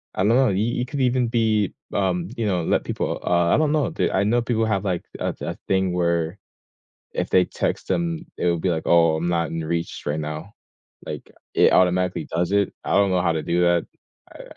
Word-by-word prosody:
I 95 - 0
know, 120 +5 +4
you 100 +1 +1
you 120 +1 -1
could 135 +1 -4
even 125 -1 +2
be, 110 -4 +1 0.2
um, 90 -3 0
you 115 - -1
know, 90 -4 0
let - - +1
people - - -3
uh, 85 -1 +3
I - - +4
don't 155 -1 +2
know, 155 +1 +1 0.2
I 95 - +2
know 120 +4 +2
people 115 -1 0
have, 105 -2 -1
like, 90 -3 -1 0.2
a - - -1
a - - -4
thing 95 -1 +1
where 85 0 0 0.8
if - - -3
they 90 - +5
text - - -3
them, 170 -1 -1 0.2
it - - -1
will 85 -1 +2
be 90 +3 0
like, 80 -2 -2
"Oh, 85 -2 +4
I'm 85 +2 -2
not 85 -2 0
in 80 0 -3
reach 85 +1 -3
right 75 +1 -1
now," 75 +5 -6 0.5
like, - - -7 0.2
it - - +5
automatically 90 0 +2
does 85 +2 -1
it, 100 -1 +1
I - - -2
don't 100 0 +4
know 90 -1 +2
how 85 -1 +2
to 80 - -2
do 85 +1 0
that, 85 -1 +3 0.5
I - - -11
90 Hz, 220 wpm, -23 LUFS, 85-110 Hz, 0.8 s, they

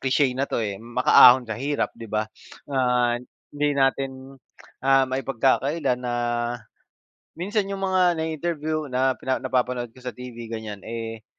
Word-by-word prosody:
cliche 135 0 +2
na 135 +2 -2
'to, - - -1
eh, 100 -2 -4
makaahon 125 +1 +6
sa 110 -2 -4
hirap, 145 +1 -1
'di 115 - -10
ba? 110 +1 0 0.4
Ah, 125 -3 +1 0.3
hindi 145 0 0
natin, 135 0 -1 0.4
ah, 135 0 +5
maipagkakaila 135 +2 0
na, 125 -1 -3 1.2
minsan 200 +5 -1
'yong 195 -1 -5
mga 190 -1 +2 0.2
nai-interview 155 -1 -2
na 130 0 +1
pina 130 0 -2
napapanood 125 -1 -1
ko 115 - -23
sa 125 - -5
TV, 125 -1 -10
ganyan, 110 -2 -6
eh, 115 -1 -6
130 Hz, 140 wpm, -24 LUFS, 120-145 Hz, 1.2 s, makaahon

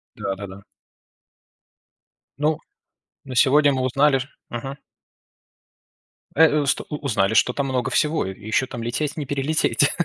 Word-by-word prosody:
Да-да-да. 95 0 -5 1.8
Ну, 150 +1 +1 0.7
на 130 -2 -7
сегодня 145 +3 +5
мы 130 -1 -1
узнали 135 +2 +3
ш 130 +2 -6 0.2
Мгм. 135 +4 -5 1.6
Э, 160 +2 +7
у 145 - -1
ст 140 - +1
узнали, 115 -9 0
что 125 +2 +3
там 140 -1 -1
много 125 -2 -1
всего 150 -5 +1
и 95 0 -7
ещё 110 +4 +1
там 120 -3 -6
лететь, 145 +6 -2
не 150 - -3
перелететь. 145 -1 +1
135 Hz, 130 wpm, -23 LUFS, 120-145 Hz, 1.8 s, Э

